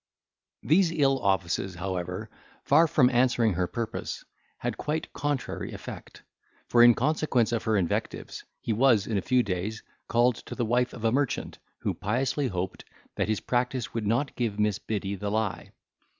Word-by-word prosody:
These 170 +3 +4
ill 135 -4 +2
offices, 95 -3 0
however, 90 +2 -4 0.4
far 160 +4 +5
from 130 -5 +4
answering 120 -3 +3
her 90 +1 0
purpose, 115 +3 -4 0.3
had - - -2
a - - -15
quite 155 +1 -3
contrary 145 -4 -3
effect. - - -9 0.5
For, 120 - +5
in 120 -1 +8
consequence 150 -7 +1
of 115 -2 -1
her 110 -2 +2
invectives, 90 -4 -2 0.2
he 115 - -1
was, 115 -3 +4
in 110 -3 0
a - - -4
few 125 +4 +2
days, 100 +2 -3 0.2
called 120 0 +3
to - - -6
the 120 - -1
wife 125 +2 +1
of 115 - -9
a 115 - +3
merchant, 140 +1 -1 0.2
who - - 0
piously 130 +6 -1
hoped, 95 -3 -4 0.3
that - - -1
his 110 - 0
practice 125 -1 -1
would 110 -3 -2
not 120 +6 0
give 115 -4 -1
Miss 105 -1 +1
Biddy 100 -2 -3
the 100 +1 -3
lie. 110 -1 -2
115 Hz, 170 wpm, -27 LUFS, 100-130 Hz, 0.5 s, in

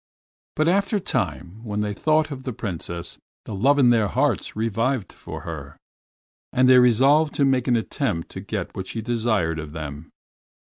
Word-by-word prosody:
But 155 +1 +2
after 200 +4 +2
a - - +2
time, 105 - -3
when 105 -2 -2
they 105 -1 -1
thought 155 +6 +1
of 135 -2 -6
the 130 -2 -5
Princess, 85 -6 -5 0.3
the - - -6
love 135 +9 +3
in 125 -4 +5
their 110 -3 +3
hearts - - 0
revived 115 +1 -1
for - - -8
her, - - -8 0.7
and 130 0 +3
they 130 0 +8
resolved 135 +6 +4
to 140 - +3
make 130 -2 +1
an 125 - +3
attempt 110 - -2
to - - -7
get - - -5
what 95 0 -5
she 115 - -4
desired 110 -9 0
of 75 -1 -7
them. 75 -1 -7
115 Hz, 180 wpm, -23 LUFS, 100-135 Hz, 0.7 s, they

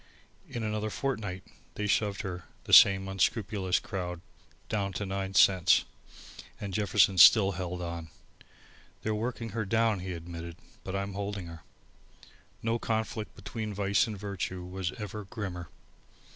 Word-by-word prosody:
In 120 - -4
another 110 0 -2
fortnight 105 -7 -3 0.3
they 105 - -2
shoved 105 -1 +1
her, 90 -2 -5 0.2
the - - -4
same 95 0 +8
unscrupulous 95 -1 0
crowd, 90 -3 -5 0.5
down 100 -2 -1
to 100 - -3
nine 95 0 -3
cents, 95 -2 +5 0.7
and 100 -2 -5
Jefferson 100 -1 +3
still 100 +2 +8
held 90 0 -4
on. 85 -1 -5 0.9
"They're 110 - 0
working 115 +1 -3
her 110 +1 -2
down," 110 0 +2
he 90 0 -5
admitted, 85 0 -7 0.3
"but 95 - -5
I'm 100 0 -3
holding 100 -1 -4
her." 85 -1 -10 1.0
No 115 +1 0
conflict 110 -1 -2
between 110 -3 -5
vice 100 +1 +2
and 105 -2 -5
virtue 95 -2 -4
was 90 0 -3
ever 105 -2 -6
grimmer. 90 -5 -6
100 Hz, 140 wpm, -30 LUFS, 90-105 Hz, 1.0 s, same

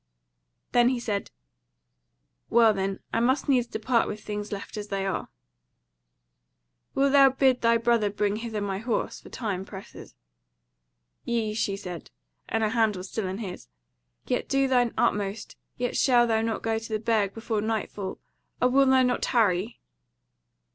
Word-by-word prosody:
Then 240 0 +5
he 255 -2 -1
said: 210 -4 -3 1.2
"Well 230 -2 +5
then, 195 0 -2
I - - +2
must 260 +4 +1
needs 250 -4 +3
depart 235 +1 +1
with 210 - -5
things 210 -1 -5
left 200 +1 -6
as 210 -1 -5
they 195 -1 -2
are: 195 - -3 1.7
wilt 275 0 +3
thou 275 -1 +7
bid 265 -1 +2
thy 230 0 +4
brother 230 -2 +2
bring 205 0 -1
hither 225 -2 -4
my 195 -1 -2
horse, 230 0 -2
for - - -13
time 200 -6 -3
presses." 195 0 -11 1.1
"Yea," 225 -3 -1
she 200 -2 -1
said 180 -4 -8 0.4
(and 225 0 0
her 215 - +2
hand 220 -2 +2
was 185 +1 -7
still 220 -4 -3
in 185 +1 -4
his), 195 -5 -7 0.6
"Yet - - -2
do 275 0 +2
thine 245 -3 +3
utmost, 205 +1 -1 0.2
yet 245 0 -2
shalt 240 -3 +4
thou 220 -1 +2
not 225 0 -2
get 225 0 0
to 225 0 -7
the 215 - 0
Burg 215 -3 0
before 225 -2 -2
nightfall. 210 -3 -3 0.4
O 250 - +3
wilt 270 +1 +4
thou 260 0 +5
not 250 0 +1
tarry?" 215 -3 +1
225 Hz, 160 wpm, -26 LUFS, 205-240 Hz, 1.7 s, thou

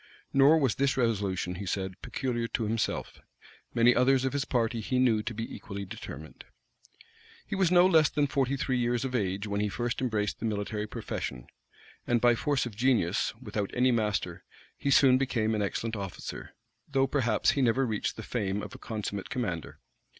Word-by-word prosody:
Nor 140 +4 +6
was 135 -8 +2
this 135 0 +1
resolution, 100 -7 0
he 100 - -5
said, 95 0 -2
peculiar 120 -3 -2
to 115 - -2
himself: 110 0 -2 0.6
many 120 +1 +6
others 130 +1 +3
of 130 - -1
his 140 0 -1
party 115 -3 0
he 130 +4 -1
knew 120 -4 +3
to 115 - -4
be 115 +1 -5
equally 100 -2 -6
determined. 80 -4 -9 1.0
He - - -6
was 190 -3 +2
no 175 0 +7
less 160 -5 +5
than 145 -2 +1
forty 140 -1 0
three 130 -1 0
years 120 +1 0
of 130 - -4
age 100 -3 -1
when 100 0 -1
he 105 - 0
first 120 +3 -2
embraced 110 -5 -1
the - - -3
military 105 0 -2
profession; 65 - -5 0.6
and 120 -1 +3
by 120 +1 +5
force 140 +3 0
of 115 -4 -7
genius, 115 -6 +2
without 105 -4 -3
any 125 +1 +4
master, 105 -4 -1 0.3
he 140 - -2
soon 130 -2 +6
became 115 -5 0
an 105 - 0
excellent 110 +3 -2
officer; 100 -3 -7 0.3
though 135 -1 +3
perhaps 125 -6 +2
he 140 - 0
never 130 +2 +3
reached 110 -4 -2
the 110 - -7
fame 105 -3 -2
of - - -8
a 130 - -10
consummate 105 -5 -4
commander. 90 - -3
115 Hz, 185 wpm, -29 LUFS, 105-130 Hz, 1.0 s, no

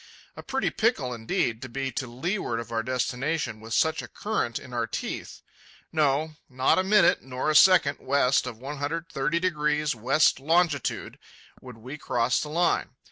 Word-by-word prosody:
A - - -8
pretty 265 -1 -1
pickle, 180 - 0
indeed, 115 0 -1
to 130 - -7
be 135 +2 -3
to 130 +1 -4
leeward 125 - -3
of 115 0 -8
our 115 -1 0
destination 130 +1 -2
with 110 +1 -5
such 160 0 +2
a - - -9
current 205 - -2
in 130 -3 -10
our 120 -1 -1
teeth. - - -5 0.5
No; 155 0 +1
not 130 +6 +2
a - - +2
minute, 200 -2 +4
nor 130 +3 -2
a - - -1
second, 170 -4 +6
west 140 -2 +2
of 110 - -6
130° 150 +2 -1
west 130 +6 +2
longitude 160 -1 0 0.4
would 125 -3 -11
we 130 +7 -9
cross 120 -1 +1
the 150 - -4
Line. 170 +2 0
140 Hz, 160 wpm, -26 LUFS, 125-160 Hz, 0.5 s, second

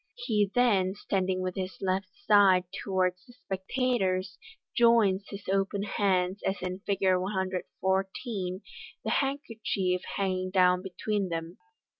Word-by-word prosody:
He 215 -5 +1
then, 200 -7 +3
standing 190 -2 -1
with 185 0 -2
his 185 -1 -4
left 190 0 -1 0.2
side 195 -3 +6 0.2
towards 185 -1 0
the 245 - -15
spectators, 190 -4 -1 0.4
joins 225 -5 +4
his 200 0 -8
open 195 +1 0
hands, 190 -2 0
as 190 - -1
in 185 0 -3
Fig. 200 -1 -2 0.2
114, 190 +1 -2 0.4
the - - -2
handkerchief 220 -9 -1
hanging 185 -1 -1
down 180 -1 +4
between 195 +1 -2
them. 165 +1 -5
190 Hz, 120 wpm, -29 LUFS, 185-205 Hz, 0.4 s, side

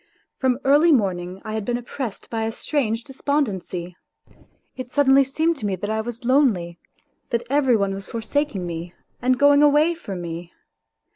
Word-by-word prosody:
From 255 -2 +2
early 295 +5 +5
morning 185 - 0
I 215 - -4
had 220 -1 -2
been 240 +3 -1
oppressed 245 -2 -6
by 225 -1 -1
a 225 - -1
strange 230 -3 -1
despondency. 210 - -2 0.8
It 255 -1 -7
suddenly 275 -1 +5
seemed 315 +5 0
to 215 - -5
me 195 - -1
that 205 +4 -4
I 220 0 0
was 235 +1 -7
lonely, 215 - +2 0.5
that 235 0 -1
every 275 -4 +4
one 200 -1 0
was 195 0 -7
forsaking 230 -3 -2
me 170 0 -6 0.3
and 255 +1 +2
going 285 +1 +5
away 295 +3 +5
from 200 - -7
me. 170 0 -7
235 Hz, 165 wpm, -23 LUFS, 195-280 Hz, 0.8 s, early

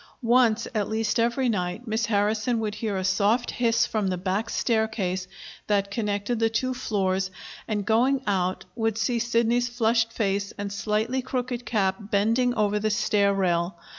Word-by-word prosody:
Once 235 -1 +3
at 210 -3 -1
least 220 0 0
every 240 +3 +1
night, 190 0 -2
Miss 220 0 0
Harrison 215 +2 +1
would 215 -2 -2
hear 215 -2 -3
a 190 - -2
soft 205 +5 +2
hiss 230 -1 +2
from 215 -3 -1
the 185 -1 -1
back 190 +5 -2
staircase 220 -7 -1 0.4
that 200 -1 +1
connected 210 +1 -1
the 225 0 +3
two 255 +3 -1
floors, 190 -5 -1 0.4
and, 210 -2 -2
going 255 +5 +2
out, 185 -2 -1
would 225 -2 -1
see 235 +1 0
Sidney's 235 +1 +1
flushed 230 -1 +1
face 200 -2 -1
and 200 0 -4
slightly 220 +5 -1
crooked 250 -1 -4
cap 190 -4 +1
bending 225 +4 +1
over 210 -1 +1
the 215 +1 0
stair 205 -1 +2
rail. 180 -2 0
220 Hz, 165 wpm, -25 LUFS, 200-235 Hz, 0.4 s, Once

